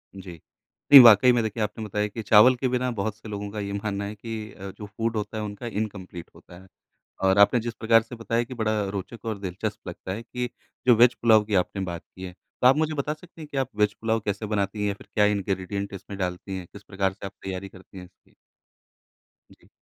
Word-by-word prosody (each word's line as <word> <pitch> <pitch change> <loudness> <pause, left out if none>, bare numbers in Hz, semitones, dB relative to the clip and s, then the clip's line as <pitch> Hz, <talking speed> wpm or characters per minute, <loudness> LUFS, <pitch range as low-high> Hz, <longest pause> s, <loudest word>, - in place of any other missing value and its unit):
जी। 95 -2 -9 0.6
नहीं 140 - +13
वाकई 115 +1 +8
में 120 -1 +2
देखिए 110 0 -2
आपने 105 +2 -4
बताया 105 0 -1
कि 110 +2 -7
चावल 110 +5 +7
के 130 +1 -1
बिना 125 0 0
बहुत 110 -1 -3
से 110 0 -11
लोगों 100 -1 -5
का 105 - -5
ये 100 -1 -4
मानना 100 0 -3
है 105 +1 -6
कि 110 0 -7
अ, 95 0 -8
जो 105 - -10
फूड 115 +3 -3
होता 105 +1 -4
है 110 - -3
उनका 105 +3 -6
इनकंप्लीट 100 -6 -5
होता 90 - -15
है। 95 - -17 0.6
और 95 +1 +3
आपने 100 +4 +5
जिस 115 0 -5
प्रकार 115 0 +4
से 115 +2 -10
बताया 115 +1 -1
कि 130 - -9
बड़ा 110 -2 0
रोचक 100 +3 -7
और 110 -2 -3
दिलचस्प 95 -1 -5
लगता 95 - -6
है 110 - -5
कि 125 +1 -4 0.4
जो 125 - +7
वेज़ 120 +2 +6
पुलाव 110 -2 +5
की 105 0 -3
आपने 95 +1 0
बात 85 -2 -6
की 95 - -11
है, 90 -1 -6
तो 95 - -4
आप 130 +2 +7
मुझे 155 0 0
बता 145 +1 -2
सकती 165 +1 -17
हैं 155 - -8
कि - - -7
आप 135 -2 0
वेज़ 105 0 +2
पुलाव 115 0 0
कैसे 105 +1 -2
बनती 105 0 -2
हैं 105 - +1
या 100 - -1
फिर - - -16
क्या 105 - +4
इंग्रीडिएंट 100 0 -2
इसमें 100 +1 -9
डालती 90 +1 -4
हैं, 90 -2 -7
किस 100 - -12
प्रकार 95 -2 -1
से 100 - -9
आप 95 - -8
तैयारी 95 0 -5
करती 95 0 -14
हैं 90 - -9
इसकी? 90 - -24 1.2
जी। - - -22
105 Hz, 240 wpm, -25 LUFS, 100-115 Hz, 1.2 s, नहीं